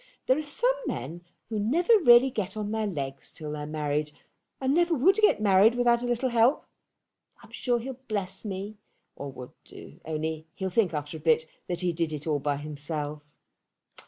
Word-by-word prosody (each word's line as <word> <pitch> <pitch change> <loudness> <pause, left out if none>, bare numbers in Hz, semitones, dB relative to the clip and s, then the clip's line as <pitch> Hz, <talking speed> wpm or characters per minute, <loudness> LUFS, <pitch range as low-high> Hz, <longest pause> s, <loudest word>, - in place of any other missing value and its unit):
There 260 - +4
are 305 - -1
some 435 +12 +1
men 140 +8 -4 0.3
who 220 -2 -2
never 325 - +3
really 250 -4 +7
get 210 -3 -3
on 210 -1 -3
their 220 -1 -1
legs 140 -7 -5
till 150 -2 -7
they're 150 0 -5
married, 150 -1 -2 0.5
and 265 0 +1
never 345 +1 +3
would 370 - +4
get 425 - +4
married 205 +2 +5
without 240 -1 +3
a 245 - -2
little 245 +2 0
help. 240 +4 +3 0.8
I'm - - -16
sure 245 -2 0
he'll 255 +2 -6
bless 195 -3 -3
me, 205 +1 -6 0.4
or 140 -1 -6
would 125 -1 -10
do, - - -13
only 160 0 -4
he'll 190 -2 -3
think 185 -4 +2
after 150 +2 -4
a - - -11
bit 160 0 +2 0.2
that 175 0 -3
he 180 -1 0
did 165 -1 -1
it 150 -1 -5
all 150 -3 0
by 145 0 -1
himself. 150 0 -5
190 Hz, 190 wpm, -27 LUFS, 150-240 Hz, 0.8 s, really